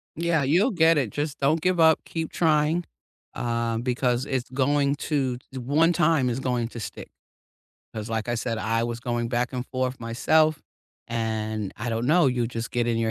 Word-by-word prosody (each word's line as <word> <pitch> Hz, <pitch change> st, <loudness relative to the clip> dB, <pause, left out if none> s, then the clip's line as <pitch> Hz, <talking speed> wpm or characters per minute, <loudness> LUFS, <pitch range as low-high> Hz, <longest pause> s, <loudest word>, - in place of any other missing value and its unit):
Yeah, 165 Hz, -2 st, +1 dB
you'll 180 Hz, -, +3 dB
get 165 Hz, -4 st, +4 dB
it, 130 Hz, -7 st, +1 dB
just 145 Hz, +3 st, -4 dB
don't 150 Hz, +4 st, +2 dB
give 180 Hz, 0 st, +1 dB
up, 160 Hz, -1 st, +5 dB
keep 160 Hz, -1 st, -4 dB
trying, 160 Hz, +1 st, +2 dB, 0.5 s
uh, 115 Hz, -1 st, -1 dB
because 125 Hz, +1 st, 0 dB
it's 130 Hz, -2 st, -2 dB
going 140 Hz, +2 st, +1 dB
to 135 Hz, -4 st, -1 dB
the 130 Hz, -, -6 dB
one 155 Hz, +7 st, +3 dB
time 155 Hz, -6 st, +2 dB
it's 120 Hz, -, -2 dB
going 125 Hz, -3 st, -1 dB
to 120 Hz, -, -8 dB
stick, 105 Hz, -, -7 dB, 0.9 s
'cause 110 Hz, 0 st, -5 dB
like 115 Hz, +1 st, -2 dB
I 120 Hz, -, 0 dB
said, 115 Hz, -1 st, -2 dB
I 115 Hz, +1 st, 0 dB
was 120 Hz, 0 st, -4 dB
going 120 Hz, -1 st, -2 dB
back 120 Hz, +1 st, -1 dB
and 125 Hz, 0 st, -3 dB
forth 130 Hz, 0 st, -2 dB
myself, 155 Hz, +7 st, +2 dB, 0.5 s
and 110 Hz, -3 st, -2 dB
I 120 Hz, -, -4 dB
don't 115 Hz, +1 st, -1 dB
know, 165 Hz, 0 st, +4 dB
you'll 125 Hz, -2 st, +1 dB
just 115 Hz, 0 st, -5 dB
get 120 Hz, -1 st, 0 dB
in 120 Hz, -1 st, +1 dB
your 115 Hz, -1 st, 0 dB
125 Hz, 190 wpm, -25 LUFS, 115-150 Hz, 0.9 s, up